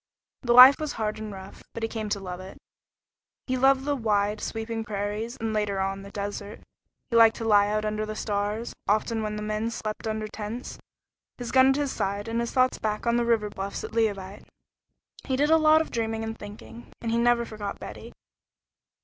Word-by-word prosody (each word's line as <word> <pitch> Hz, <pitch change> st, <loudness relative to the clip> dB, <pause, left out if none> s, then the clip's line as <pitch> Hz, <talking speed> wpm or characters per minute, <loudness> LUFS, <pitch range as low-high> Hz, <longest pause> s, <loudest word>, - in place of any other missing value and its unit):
The 240 Hz, -2 st, +2 dB
life 255 Hz, +3 st, +10 dB
was 305 Hz, -1 st, -3 dB
hard 215 Hz, -1 st, -3 dB
and 215 Hz, -1 st, -6 dB
rough, 190 Hz, 0 st, -10 dB
but 230 Hz, -, -5 dB
he -, -, +1 dB
came 220 Hz, -2 st, -4 dB
to 205 Hz, -, -1 dB
love 180 Hz, -2 st, -6 dB
it. 185 Hz, +1 st, -10 dB, 0.9 s
He 255 Hz, -, -1 dB
loved 265 Hz, +1 st, +3 dB
the 290 Hz, 0 st, +1 dB
wide, 210 Hz, -3 st, 0 dB
sweeping 225 Hz, 0 st, -4 dB
prairies, 210 Hz, +2 st, -4 dB
and, 225 Hz, -1 st, -3 dB
later 210 Hz, -2 st, 0 dB
on, 195 Hz, 0 st, -2 dB
the 200 Hz, -, -10 dB
desert. 205 Hz, +1 st, -6 dB, 0.5 s
He -, -, 0 dB
liked 225 Hz, -1 st, +7 dB
to 225 Hz, -, -5 dB
lie 205 Hz, -1 st, +5 dB
out 215 Hz, +1 st, -1 dB
under 215 Hz, 0 st, -1 dB
the 215 Hz, 0 st, -5 dB
stars, 210 Hz, +2 st, -2 dB
often 220 Hz, +2 st, +1 dB
when 210 Hz, -1 st, -3 dB
the 210 Hz, -, -4 dB
men 215 Hz, +1 st, -1 dB
slept 220 Hz, -1 st, -5 dB
under 215 Hz, 0 st, -2 dB
tents, 215 Hz, +3 st, -6 dB, 0.6 s
his 245 Hz, -2 st, -5 dB
gun 260 Hz, 0 st, +6 dB
at 270 Hz, -, +3 dB
his 285 Hz, -1 st, -1 dB
side 200 Hz, +2 st, -2 dB
and 230 Hz, +1 st, -1 dB
his 235 Hz, 0 st, -1 dB
thoughts 255 Hz, -1 st, +2 dB
back 210 Hz, 0 st, -2 dB
on 235 Hz, 0 st, +2 dB
the 240 Hz, -, +1 dB
river 220 Hz, -3 st, +1 dB
bluffs 195 Hz, 0 st, -5 dB
at -, -, -6 dB
Leauvite. 205 Hz, -3 st, -2 dB, 0.8 s
He 265 Hz, -, 0 dB
did 295 Hz, +4 st, +2 dB
a 320 Hz, -, +7 dB
lot 310 Hz, 0 st, +5 dB
of 320 Hz, -, -5 dB
dreaming 225 Hz, -1 st, -2 dB
and 225 Hz, 0 st, -4 dB
thinking, 120 Hz, -, -11 dB
and 230 Hz, -, -3 dB
he 230 Hz, -, +2 dB
never 240 Hz, 0 st, +3 dB
forgot 210 Hz, -3 st, -6 dB
Betty. -, -, -9 dB
220 Hz, 210 wpm, -26 LUFS, 205-235 Hz, 0.9 s, life